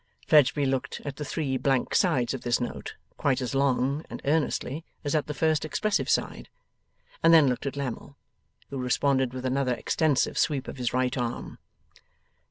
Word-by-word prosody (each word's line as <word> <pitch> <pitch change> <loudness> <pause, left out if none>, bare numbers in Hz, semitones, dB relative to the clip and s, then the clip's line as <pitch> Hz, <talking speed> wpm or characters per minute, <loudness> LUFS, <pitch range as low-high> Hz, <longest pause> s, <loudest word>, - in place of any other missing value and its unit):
Fledgeby 145 -1 +4
looked 135 -1 -2
at 140 -2 -5
the 150 - -4
three 140 -3 -2
blank 135 -1 0
sides 125 -1 +2
of 135 - -5
this 120 0 +1
note, 120 - -5 0.2
quite 135 -2 +1
as 130 0 -3
long 135 +2 +1
and - - -7
earnestly 150 0 0 0.2
as 145 - -2
at 155 -2 +1
the 150 - -3
first 160 -2 +1
expressive 210 +7 -1
side, - - -1 0.7
and 165 - +5
then 160 -4 +7
looked 125 +2 -1
at 140 - -3
Lammle, 140 +1 -5 0.5
who 135 - -4
responded 130 0 +1
with 130 0 -6
another 130 -1 +1
extensive 150 +3 +1
sweep 140 -4 0
of - - -7
his 125 -2 -1
right 125 0 0
arm. 120 -2 -4
135 Hz, 175 wpm, -27 LUFS, 125-150 Hz, 0.7 s, then